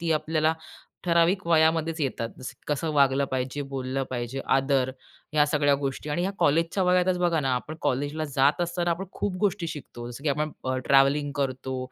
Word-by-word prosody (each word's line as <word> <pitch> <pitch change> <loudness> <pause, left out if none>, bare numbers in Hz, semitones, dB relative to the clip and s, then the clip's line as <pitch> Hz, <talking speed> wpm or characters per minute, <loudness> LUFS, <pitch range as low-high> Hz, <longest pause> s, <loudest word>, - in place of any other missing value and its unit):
ती 170 -1 -2
आपल्याला 155 +1 +1 0.5
ठराविक 170 +2 +2
वयामध्येच 160 0 +2
येतात. 125 -5 -1
जसं, 130 - -7
कसं 150 +2 -1
वागलं 140 -1 +3
पाहिजे, 130 +2 -2
बोललं 130 0 -2
पाहिजे, 125 +1 -3
आदर, 135 -1 +2 0.4
ह्या 150 -1 +4
सगळ्या 145 -1 +3
गोष्टी 140 +1 -3
आणि 170 +4 0
ह्या 190 +2 -1
कॉलेजच्या 165 +6 +2
वयातच 180 0 +3
बघा 170 -2 +2
ना, 135 -2 +1
आपण 135 +5 -4
कॉलेजला 145 +4 -1
जात 140 +5 +4
असताना 175 0 -1
आपण 170 +3 -1
खूप 195 -3 -2
गोष्टी 195 -4 0
शिकतो. 125 -6 -8
जसं 120 +3 -9
की 155 - +2
आपण 150 +2 0 0.4
ट्रॅव्हलिंग 140 +1 +4
करतो, 130 -1 -2
150 Hz, 170 wpm, -26 LUFS, 135-165 Hz, 0.5 s, ह्या